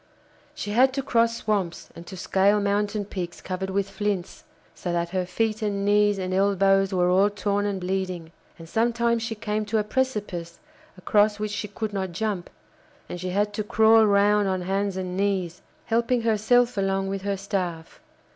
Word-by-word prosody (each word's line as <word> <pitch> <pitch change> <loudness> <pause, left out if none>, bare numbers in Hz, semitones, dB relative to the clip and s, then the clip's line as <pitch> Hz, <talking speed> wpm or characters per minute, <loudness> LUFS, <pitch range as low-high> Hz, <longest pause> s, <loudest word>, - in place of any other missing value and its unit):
She 205 - -5
had 255 +4 +4
to 275 0 -2
cross 230 -2 +2
swamps 195 -5 -2
and 170 +1 -11
to 190 - -8
scale 195 +3 +2
mountain 205 +1 0
peaks 180 -3 -6
covered 190 +1 -4
with 195 +1 0
flints, 200 -2 -3 0.3
so 175 - -5
that 170 0 -1
her 180 0 -2
feet 220 +4 -1
and 200 -2 -1
knees 205 0 +3
and 185 -1 -3
elbows 195 0 +3
were 180 -1 +2
all 195 +3 +4
torn 205 0 -1
and 200 -2 -2
bleeding, 185 -3 -3 0.3
and 165 - -11
sometimes 235 +3 +1
she 225 0 -3
came 215 0 -2
to 220 - 0
a 210 - +2
precipice 210 -8 -3 0.4
across 205 +3 +2
which 210 0 -3
she 210 0 -3
could 210 +1 -5
not 190 -3 -3
jump, 200 -1 -3 0.6
and 175 - -7
she 185 - -3
had 205 +3 0
to 215 - -2
crawl 220 +1 +5
round 205 0 +3
on 185 -1 -1
hands 195 +1 -1
and 185 -1 -4
knees, 190 -3 -1 0.2
helping 235 +1 +1
herself 230 +2 +2
along 195 0 0
with 195 0 -3
her 200 0 -2
staff. 180 -4 -4
200 Hz, 180 wpm, -25 LUFS, 185-215 Hz, 0.6 s, crawl